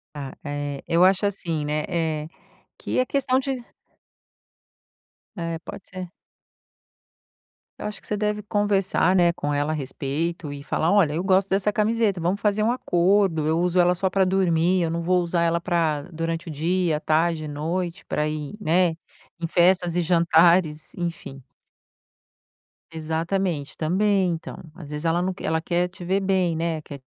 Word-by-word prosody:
Ah, 140 -3 -6
eh, 145 -1 -4
eu 170 +2 +4
acho 190 +2 +4
assim, 170 -6 -2
né, 150 +1 -1
eh, 155 -2 -1 0.5
que - - -3
é 255 - +4
questão 260 -1 +1
de 265 -2 -3 1.7
É, 165 -2 -3
pode 185 - -10
ser. 185 -2 -7 1.7
Eu - - -4
acho 210 -1 -6
que - - -15
você 210 - -1
deve 210 0 -1
conversar, 200 -3 +1
né, 175 -2 +4
com 145 -3 -3
ela 145 +1 0
a - - 0
respeito 150 +3 -3
e 140 0 -8
falar: 160 +3 0
"Olha, 195 -7 +4
eu 165 - -1
gosto 190 0 +3
dessa 200 +2 +1
camiseta 215 -3 +1
vamos 180 +5 0
fazer 210 0 +1
um 230 - +3
acordo, 180 -6 +2
eu 160 +1 +2
uso 180 0 +1
ela 180 0 +5
só 185 +1 -1
para 190 0 +3
dormir, 185 -1 +2
eu 165 - 0
não 165 +1 -2
vou 180 +1 +2
usar 170 0 0
ela 170 0 +1
para 165 -5 0
durante 165 +1 -3
o - - -5
dia, 165 +1 0
tarde 160 +1 +1
e - - -5
noite 170 +5 -3
para 150 0 -1
ir, 150 +4 -5
né, 175 -2 +2 0.4
em 170 - -1
festas 175 0 +3
e 175 - +2
jantares, 170 -2 +3
enfim 170 -6 -5 1.5
Exatamente, 160 0 -2
também, 190 +3 +2
então, 165 -1 -5 0.2
às 165 -5 -11
vezes 150 +1 -6
ela 165 +1 +2
não 185 +1 -1
quer - - -11
ela 160 +1 +1
quer 175 +2 0
te 180 0 -11
ver 190 +2 +1
bem, 190 -4 +1
né, 165 -1 -1
quer 140 -3 -10
170 Hz, 170 wpm, -24 LUFS, 160-190 Hz, 1.7 s, ela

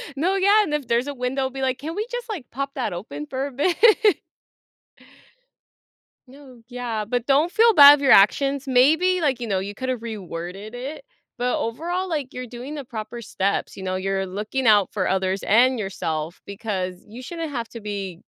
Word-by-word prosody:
No, 360 +7 0
yeah, 405 +2 +4
and, 300 - -4
if 290 -5 -2
there's 235 +4 +1
a 285 - -3
window, 260 +1 -2
be 270 0 -6
like, 260 0 0
"Can 320 +5 -6
we 425 +2 -2
just, 485 0 -5
like, 365 - -6
pop 275 +2 -4
that 245 -8 -3
open 150 -5 -7
for 265 +1 -3
a 285 - -6
bit?" 295 +7 0 2.5
No, 260 -3 -15
yeah, 240 -4 -4
but, 245 +1 -2
don't 290 +6 +3
feel 460 0 +5
bad 285 -2 +10
of 285 - -8
your 270 - +3
actions. 275 +7 +4
Maybe, 320 +8 +3
like, 270 -5 +1
you 235 - -4
know, 195 -2 0
you 200 +2 -5
could've 255 0 -3
reworded 195 -1 -7
it, 275 - -7 0.3
but 245 0 0
overall, 345 +11 -3
like, 290 -6 -3
you're 250 0 -6
doing 250 +5 -8
the 285 - -5
proper 230 +1 -7
steps, 200 -2 -2
you 190 - -7
know? 185 0 -2
You're 195 +1 -1
looking 210 +7 -3
out 205 -3 +5
for 190 -3 -1
others, 190 0 0
and 245 +3 +4
yourself, 165 -4 -4
because 195 -3 -4
you 235 +4 -10
shouldn't 325 +2 -6
have 235 -4 -4
to 230 - -9
be 195 -4 -5
250 Hz, 195 wpm, -23 LUFS, 205-285 Hz, 2.5 s, bad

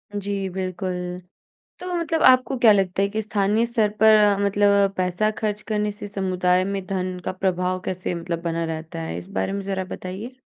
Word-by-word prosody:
जी, 205 0 -3 0.2
बिल्कुल। 185 0 -3 0.9
तो 360 0 -5
मतलब 330 -2 -1
आपको 255 +1 +5
क्या 230 -3 +6
लगता 195 -1 +2
है 200 - +3
कि 220 - +1
स्थानीय 210 +2 +1
स्तर 225 -3 +1
पर 220 0 +8 0.3
मतलब 200 0 +3
पैसा 185 +4 +1
खर्च 210 -1 -2
करने 210 0 0
से 205 0 -8
समुदाय 185 -2 +1
में 195 -1 -3
धन 185 -2 -2
का - - -1
प्रभाव 185 -1 -1
कैसे 185 -1 -3
मतलब 170 0 -4
बना 165 0 -1
रहता 160 +1 -5
है? 160 - -4
इस 180 - -8
बारे - - 0
में 200 - -2
ज़रा 190 -1 -3
बताइए। 205 +8 -7
195 Hz, 185 wpm, -23 LUFS, 185-210 Hz, 0.9 s, पर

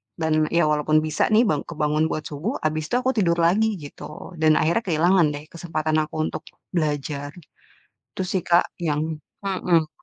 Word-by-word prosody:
dan 155 -1 +1
ya 170 - +4
walaupun 150 +1 +2
bisa 155 -1 +1
nih 220 - +6
bang 150 - +1
kebangun 155 -1 0
buat 155 - -2
subuh, 165 - -3
abis 155 0 0
itu - - 0
aku 260 - +1
tidur 175 -5 +3
lagi, 210 +6 +3
gitu. 150 +4 -10
Dan 155 -1 +5
akhirnya 170 +9 +1
kehilangan 175 +1 +3
deh 145 +1 -7
kesempatan 155 -2 -2
aku 155 - -9
untuk - - -6 0.3
belajar. 145 -2 -2 0.8
Itu - - -1
sih 185 0 0
Kak, 170 +1 +2
yang 155 -1 -1 0.2
mhm. 180 -4 +1
155 Hz, 170 wpm, -23 LUFS, 150-175 Hz, 0.8 s, nih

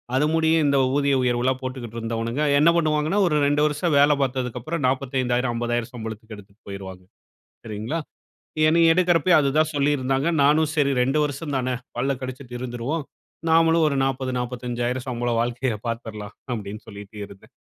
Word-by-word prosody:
அது 140 +3 +3
முடியும் 160 0 +3
இந்த 140 0 +3 0.2
ஊதிய 140 -1 +2
உயர்வுலாம் 125 +1 +1
போட்டுக்கிட்டு 125 -3 -6
இருந்தவனுங்க, 115 +3 -3 0.2
என்ன 160 +3 +6
பண்ணுவாங்கன்னா 155 +3 +1
ஒரு 150 - +1
2 145 +1 +2
வருஷம் 150 +1 0
வேலை 145 +1 +5
பார்த்ததுக்கப்பறம் 130 +3 -2
40000, 130 -2 0
50000 120 0 -2
சம்பளத்துக்கு 110 -1 -7
எடுத்துட்டு 100 +2 -17
போயிருவாங்க, 95 -2 -8 0.6
சரிங்களா? 110 +9 -4 0.7
என்னய 165 +1 +5
எடுக்குறப்பயும் 175 -1 +4
அது 140 - +1
தான் 155 0 +2
சொல்லியிருந்தாங்க. 140 0 +1 0.2
நானும், 150 +2 +4
"சரி 145 -3 +2
2 135 +5 +2
வருஷம் 145 0 -3
தான 130 0 -1 0.3
பல்ல 140 - 0
கடிச்சுட்டு 130 -1 -7
இருந்துருவோம். 125 +5 -3 0.5
நாமளும் 165 0 +4
ஒரு 140 - 0
40, 130 -1 -2
450000 125 0 -3
சம்பளம் 120 -1 -1
வாழ்க்கைய 120 -1 -1
பார்த்துறலாம்." 110 -2 -6 0.2
அப்படினு 105 -2 -6
சொல்லிட்டு 100 0 -11
இருந்தேன். 100 -1 -16
130 Hz, 145 wpm, -23 LUFS, 120-150 Hz, 0.7 s, என்ன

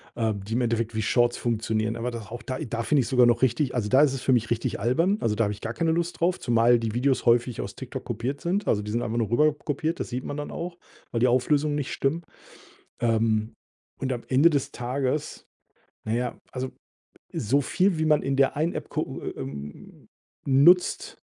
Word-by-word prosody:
äh, 110 -2 0
die 100 +2 -6
im 125 - +1
Endeffekt 115 -1 -1
wie 110 - 0
Shorts 120 +2 +2
funktionieren. 110 -1 -1
Aber 120 +2 -2
da 115 - -5
auch 120 +1 -7
da 130 -1 -4
da 115 -6 -3
finde 145 +3 +3
ich 120 - -3
sogar 125 -3 +5
noch 120 +1 +3
richtig 130 +2 +1
also, 110 -4 -1
da 130 +4 +5
ist 145 -3 +4
es 135 - -4
für 130 - +1
mich 120 -2 +1
richtig 115 -3 -1
albern. 165 - +2
Also, 105 -2 +1
da 115 - +2
habe 105 - -1
ich 105 - -11
gar 115 - -4
keine 165 +3 0
Lust 170 +1 -1
drauf, 175 +2 +2
zumal 120 0 +4
die 110 -1 -3
Videos 130 +2 +1
häufig 120 0 +3
aus - - -7
TikTok - - -7
kopiert 135 +4 -3
sind. 190 +3 -1
Also, 105 - +2
die 105 0 -5
sind 120 - 0
einfach 115 0 -2
nur 110 -3 0
rüber 150 +5 +3
kopiert. 150 +2 -3
Das - - -4
sieht 125 +1 -4
man 145 - -5
dann 145 - -5
auch, 170 0 -6 0.3
weil 115 - -1
die 125 - +4
Auflösungen 145 +4 +2
nicht 145 -2 -3
stimmen. 160 +5 -1 0.8
Ähm, 110 -1 +1 0.5
und 130 -1 -1
am 120 - -4
Ende 140 +6 +5
des 145 -4 -1
Tages 130 +4 -3 0.6
na 110 - 0
ja, 125 0 -2
also, 130 0 -4 0.6
so 135 +7 +1
viel, 180 +5 +1
wie 160 - +1
man 150 -1 +4
in 135 0 0
der 135 0 +3
einen 160 +3 0
App - - -6
gucken, - - -4
äh, - - -4
ähm 70 +2 -9 0.4
nutzt 150 +7 +4
125 Hz, 220 wpm, -26 LUFS, 115-145 Hz, 0.8 s, sogar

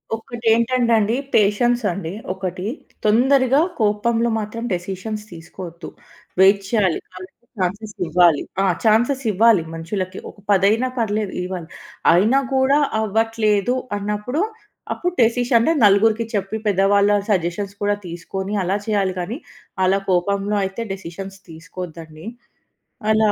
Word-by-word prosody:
ఒకటేంటంటే 235 +1 +1
అండి. 215 +3 +1 0.2
పేషెన్స్ 240 +4 +3
అండి 170 -2 -5 0.2
ఒకటి. 185 -1 -5 0.4
తొందరగా 260 +5 +4 0.2
కోపంలో 225 +2 +1
మాత్రం 215 +2 -5
డేసిషన్స్ 195 +4 -4
తీసుకోవద్దు. 170 +1 -9 0.5
వెయిట్ 195 +1 +6
చేయాలి. 200 -7 +1
వాళ్ళకు 185 +1 -9 0.3
ఛాన్సెస్ 205 +4 -3
ఇవ్వాలి. 170 -2 +4 0.2
ఆ! - - +3 0.2
ఛాన్సెస్ 240 +5 +3
ఇవ్వాలి 215 -2 +4
మనుషులకి. 185 +3 -4
ఒక - - -15
పదైనా 205 +6 +3
పర్లేదు 210 -3 -1
ఇవ్వాలి. 180 -3 -5 0.5
అయినా 215 +10 +4 0.2
కూడా 265 +2 +4 0.2
అవ్వట్లేదు 220 +1 +1 0.2
అన్నప్పుడు, 210 - -2 0.5
అప్పుడు 355 0 -2
డేసిషన్స్ 235 +4 +3
నలుగురికి 215 +3 +4
చెప్పి, 200 +2 -2
పెద్దవాళ్ళ 200 +1 +3 0.2
సజెషన్స్ 195 +2 -1
కూడా 205 0 +2
తీసుకొని, 190 +4 -5
అలా 190 +3 0
చేయాలి 200 -3 +1
కానీ. 205 +9 -4 0.5
అలా 195 +2 +3
కోపంలో 200 +3 +1
అయితే 195 +4 -4
డేసిషన్స్ 195 +1 -8
తీసుకోద్దండి 165 0 -9 0.8
అలా 215 -1 +4
205 Hz, 115 wpm, -21 LUFS, 185-225 Hz, 0.8 s, వెయిట్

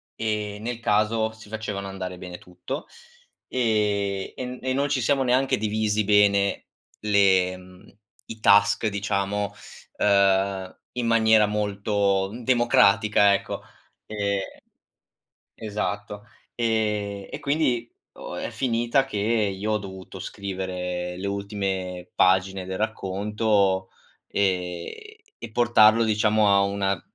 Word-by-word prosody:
e, 105 -2 -2
nel 120 +1 -4
caso, 110 0 +1
si 110 -2 -15
facevano 105 -3 -5
andare 95 -1 -6
bene 90 -1 -8
tutto, 90 - -7 0.6
ehm, 105 -5 0
e 130 - -5
n 125 0 -7
e 130 0 -2
non 140 +2 +1
ci 135 -2 0
siamo 135 +3 +2
neanche 130 +1 +2
divisi 105 0 0
bene 100 -1 +3 0.3
le 95 -3 +3
mhmm, 90 +2 -17 0.3
i 110 -1 -8
task, 105 +2 +4
diciamo, 100 0 -1 0.4
uhm, 100 -1 +2 0.2
in 125 -2 -2
maniera 110 -1 +5
molto, 100 -2 0
mhmm, 120 +3 -8
democratica, 105 -4 +4
ecco. 100 - -3 0.4
Ehm, 100 -2 -1 1.2
esatto, 105 -1 -4 0.3
ehm, 105 -4 -1
e - - -5
quindi 140 -5 0 0.3
o - - -8
è - - -4
finita 120 +1 +1
che 135 -6 -5
io 105 -1 0
ho 105 - +1
dovuto 95 -2 -9
scrivere 90 -2 -4
le 95 - -5
ultime 95 -3 -4
pagine 95 +1 +2
del 95 - -4
racconto, 100 -2 0 0.4
ehm, 90 -3 -1 0.5
e 115 - -8
portarlo, 115 -1 +5
diciamo, 110 -1 +2
a 100 - +5
una 100 -2 -1
105 Hz, 120 wpm, -24 LUFS, 95-110 Hz, 1.2 s, maniera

